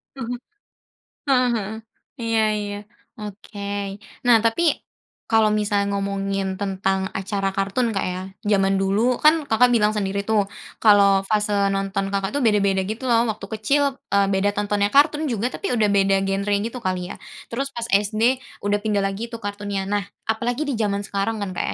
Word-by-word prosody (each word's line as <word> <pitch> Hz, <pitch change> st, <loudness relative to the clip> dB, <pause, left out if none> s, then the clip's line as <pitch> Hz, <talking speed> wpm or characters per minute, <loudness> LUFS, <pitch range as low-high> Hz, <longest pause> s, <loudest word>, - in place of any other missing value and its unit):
hah 245 Hz, -2 st, -4 dB, 0.9 s
Ah 255 Hz, -2 st, +4 dB
hah, 210 Hz, -1 st, -3 dB, 0.5 s
iya 225 Hz, -1 st, +1 dB
iya, 205 Hz, -1 st, -4 dB, 0.4 s
oke. 200 Hz, -1 st, -6 dB, 0.3 s
Nah 235 Hz, -2 st, +8 dB
tapi 295 Hz, +8 st, +2 dB, 0.5 s
kalau 220 Hz, -1 st, +4 dB
misalnya 205 Hz, -1 st, +1 dB
ngomongin 195 Hz, -1 st, -2 dB
tentang 190 Hz, -1 st, -1 dB
acara 195 Hz, 0 st, -2 dB
kartun 200 Hz, +5 st, 0 dB
,Kak, 195 Hz, -, -1 dB
ya, 185 Hz, +1 st, -4 dB, 0.2 s
zaman 195 Hz, -1 st, +3 dB
dulu 215 Hz, +6 st, +1 dB
kan, 310 Hz, 0 st, +5 dB
Kakak, 250 Hz, -1 st, +4 dB
bilang 210 Hz, -2 st, +3 dB
sendiri 200 Hz, -1 st, -2 dB
tuh 210 Hz, -2 st, +1 dB, 0.3 s
kalau 200 Hz, -2 st, +6 dB
fase 210 Hz, 0 st, +1 dB, 0.2 s
nonton, 195 Hz, 0 st, -1 dB
Kakak, 195 Hz, 0 st, -2 dB
tuh 285 Hz, -, -1 dB
beda-beda 205 Hz, -5 st, +2 dB
gitu 220 Hz, +4 st, -5 dB
loh. 235 Hz, 0 st, +4 dB
Waktu 215 Hz, -, -4 dB, 0.2 s
kecil, 280 Hz, +7 st, +2 dB, 0.2 s
eee, 200 Hz, 0 st, +2 dB
beda 200 Hz, +1 st, +1 dB
tontonnya, 205 Hz, 0 st, +1 dB
kartun 295 Hz, +5 st, +3 dB
juga 240 Hz, +1 st, -1 dB
tapi 395 Hz, -, -2 dB
udah 215 Hz, -3 st, +3 dB
beda 195 Hz, -1 st, +3 dB
genre 195 Hz, +1 st, 0 dB
gitu 235 Hz, +2 st, -4 dB
kali 185 Hz, -4 st, -3 dB
ya, -, -, -7 dB, 0.4 s
terus 270 Hz, +4 st, -2 dB
pas 235 Hz, -, -3 dB
SD 215 Hz, +5 st, +2 dB, 0.2 s
udah 205 Hz, 0 st, +1 dB
pindah 205 Hz, -2 st, 0 dB
lagi 195 Hz, +4 st, -2 dB
tuh 230 Hz, -, -6 dB
kartunnya, 205 Hz, -1 st, -3 dB
nah 205 Hz, +1 st, -1 dB, 0.3 s
apalagi 240 Hz, +6 st, -2 dB
di 270 Hz, -6 st, -3 dB
zaman 200 Hz, -1 st, 0 dB
sekarang 205 Hz, +1 st, -2 dB
kan, 190 Hz, -, -4 dB
Kak, 175 Hz, -, -2 dB
205 Hz, 165 wpm, -22 LUFS, 195-225 Hz, 0.9 s, Nah